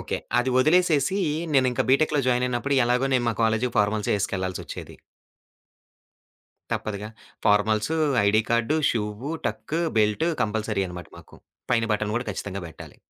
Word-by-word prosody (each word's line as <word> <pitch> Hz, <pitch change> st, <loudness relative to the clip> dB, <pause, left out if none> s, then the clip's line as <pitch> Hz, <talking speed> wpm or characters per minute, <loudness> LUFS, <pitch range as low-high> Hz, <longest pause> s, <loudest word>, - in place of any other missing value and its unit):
Okay. -, -, -3 dB, 0.2 s
అది 125 Hz, +1 st, +1 dB
వదిలేసేసి, 160 Hz, +4 st, +3 dB, 0.3 s
నేనింకా 130 Hz, -3 st, +2 dB
బీటెక్‌లో 145 Hz, +2 st, +3 dB
జాయిన్ 125 Hz, 0 st, +2 dB
అయినప్పుడు 125 Hz, +3 st, -1 dB
ఎలాగో 125 Hz, +2 st, +1 dB
నేను 125 Hz, -1 st, +2 dB
మా 115 Hz, -, 0 dB
కాలేజ్‌కి 115 Hz, +2 st, +1 dB
ఫార్మాల్సే 105 Hz, 0 st, +1 dB
వేసుకెళ్ళాల్సి 95 Hz, -2 st, -2 dB
ఒచ్చేది. -, -, -8 dB, 1.8 s
తప్పదుగా. 105 Hz, 0 st, -3 dB, 0.4 s
Formals, 105 Hz, +6 st, +2 dB, 0.3 s
ID 110 Hz, +2 st, +4 dB
card, 115 Hz, +6 st, +2 dB
షూవు, 105 Hz, +4 st, -3 dB, 0.2 s
టక్కూ, 160 Hz, +2 st, -3 dB, 0.2 s
belt 105 Hz, +10 st, +2 dB
compulsory 105 Hz, -2 st, -1 dB
అనమాట 90 Hz, 0 st, -9 dB
మాకు. -, -, -16 dB, 0.4 s
పైన 115 Hz, -1 st, +2 dB
బటన్ 105 Hz, 0 st, -2 dB
కూడా 120 Hz, -, -2 dB
ఖచ్చితంగా 100 Hz, -1 st, -5 dB
బెట్టాలి. 80 Hz, -, -12 dB
115 Hz, 135 wpm, -25 LUFS, 105-130 Hz, 1.8 s, ID